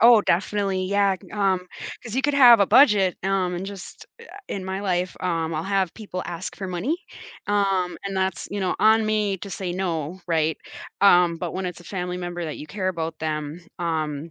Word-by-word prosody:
Oh, 230 -1 +8
definitely, 195 +1 0
yeah, 200 0 +2
can - - -17
um 190 -3 +1 0.4
'cause 230 -2 -7
you 265 - +1
could 290 +1 +1
have 245 -5 +8
a 200 - +5
budget, 200 -10 +5
um, 190 -2 +1
and 180 +2 -4
just 195 -2 -9
uh, - - -11 0.2
in 190 -2 -4
my 190 +1 -3
life 180 -2 -1
um, 165 -3 -1
I'll 155 +1 -2
have 195 -3 0
people 200 -4 -6
ask 175 +1 -6
for 190 -2 -5
money, 185 - -1 0.5
um, 195 -3 +1
and 195 -1 -3
that's, 190 -1 -1
you 205 - -3
know, 185 -2 0
on 220 0 +5
me 210 -2 0
to 200 - -8
say 185 -1 -4
no, 175 -1 -3
right? 160 -1 +1 0.4
Um, 180 -3 +5
but 170 0 -4
when 190 0 -3
it's 180 -1 -6
a - - -15
family 180 -1 -4
member 175 -1 -4
that 155 - -5
you 150 - -8
care 195 -2 -2
about 165 -3 -3
them, 155 +1 -3 0.2
um 160 -2 -2
185 Hz, 205 wpm, -24 LUFS, 175-200 Hz, 0.5 s, Oh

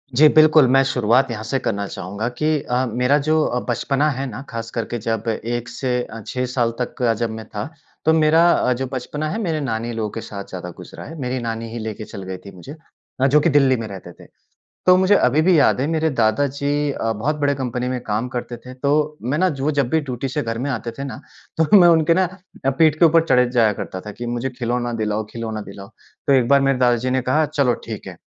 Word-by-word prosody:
जी, 155 +4 +7
बिल्कुल। 155 -2 +6
मैं 135 +1 +5
शुरुआत 120 +2 +2
यहाँ 110 -1 -5
से 125 +5 -1
करना 100 -4 -2
चाहूँगा 100 +4 -5
कि 155 -1 +1
अ, 125 0 -1
मेरा 125 +4 +2
जो 155 0 +3
अ, 125 - -1
बचपना 135 +5 +1
है 135 -1 -3
ना, 120 +3 -7
ख़ास 115 0 -5
करके 115 0 -3
जब 115 0 -2
1 120 +2 -3
से 125 -2 -2
अ, 115 - -9
6 125 0 -2
साल 120 -2 0
तक 125 - -3
का 120 -2 +2
जब 115 +1 -2
मैं 110 0 -7
था, 105 +5 -5 0.4
तो 160 - +5
मेरा 160 +2 +4
अ, 125 - +2
जो 130 +2 -3
बचपना 150 +4 -3
है 215 - -3
मेरे 160 -5 -1
नानी 115 -3 -3
लोगों 110 -2 -2
के 115 - -6
साथ 100 -2 -7
ज़्यादा 90 -1 -6
गुज़रा - - -10
है। 160 +1 -9
मेरी 125 0 -2
नानी 115 0 -4
ही 120 - -5
लेके 110 -1 -5
चल 100 - -9
गई 95 0 -6
थी 100 - -9
मुझे 115 - -10 0.5
अ, 135 - +5
जो 145 +2 +5
कि 150 - +2
दिल्ली 135 -3 +4
में 115 -1 -5
रहते 95 -3 -9
थे। - - -16 0.6
तो 180 0 +7
मुझे 190 +2 +4
अभी 135 -1 +3
भी 175 0 +4
याद 145 - +3
है, 135 - 0
मेरे 160 0 +1
दादा 110 +6 +2
जी 145 +1 -1
अ, 115 -4 -2
बहुत 125 +8 -2
बड़े 140 -1 +2
कंपनी 125 -2 -3
में 125 -1 -2
काम 110 +4 -1
करते 120 0 -5
थे, 125 +2 -12
तो 150 +3 0
मैं 130 +6 -1
ना 185 +1 +3
जो 135 -5 -4
वो 150 - +2
जब 130 - 0
भी 160 - +2
ड्यूटी 135 -2 -4
से 145 +3 -2
घर 115 -1 -3
में 135 +4 -2
आते 120 -2 -3
थे 140 - -4
ना, 135 0 -7 0.4
तो 160 - +2
मैं 175 -2 +7
उनके 165 -1 +4
ना 185 +2 +3 0.4
अ, - - +4
पीठ 155 +2 +3
के 170 - +5
ऊपर 165 0 +5
चढ़े 125 -1 +4
जाया 115 -4 +3
करता 95 -2 -6
था 105 +2 -8
कि, 120 +3 -7
"मुझे 120 +2 -2
खिलौना 120 0 -1
दिलाओ, 105 0 -1
खिलौना 110 -2 -4
दिलाओ।" 100 0 -10 0.4
तो 140 - +4
एक 130 -3 +3
बार 140 0 +5
मेरे 135 -1 +2
दादा 120 -1 +3
जी 125 +2 -2
ने 130 0 +1
कहा, 155 +4 +3
"चलो 140 -4 +1
ठीक - - -7
है।" - - -8
125 Hz, 250 wpm, -21 LUFS, 115-145 Hz, 0.6 s, जी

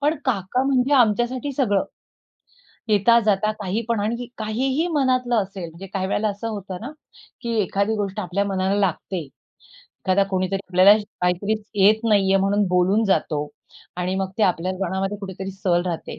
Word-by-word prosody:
पण 300 +3 +1
काका 245 0 0
म्हणजे 270 0 +2
आमच्यासाठी 245 +3 +2
सगळं. 205 -8 +1 1.0
येता-जाता 215 -1 +3
काही 205 +3 -2
पण 230 -3 +1
आणि 235 +4 -2
काहीही 260 +9 -1
मनातलं 255 -3 +1
असेल 195 -4 -2
म्हणजे 170 +4 -10
काही 190 -1 -1
वेळेला 210 +2 0
असं 205 +3 -5
होतं 195 -3 -6
ना, 255 - -6 0.5
की 235 -2 -3
एखादी 200 +3 0
गोष्ट 200 -2 -3
आपल्या 185 +3 -1
मनाला 190 0 0
लागते. 190 -1 -1 0.6
एखादा 190 +1 0
कोणीतरी 185 +1 0
आपल्याला 185 +3 +7 0.2
काहीतरी 180 +4 +1 0.3
येत 215 +2 +5
नाही 195 -2 +3
आहे 195 - +4
म्हणून 200 +1 +2
बोलून 180 +5 +2
जातो 155 -7 0 0.5
आणि 180 +1 -1
मग 190 -1 -2
ते - - +2
आपल्या 180 -1 +1
मनामध्ये 195 +2 -2
कुठेतरी 190 -1 -6
सल 185 -2 0
राहते. 170 -2 -5
200 Hz, 155 wpm, -22 LUFS, 190-230 Hz, 1.0 s, आपल्याला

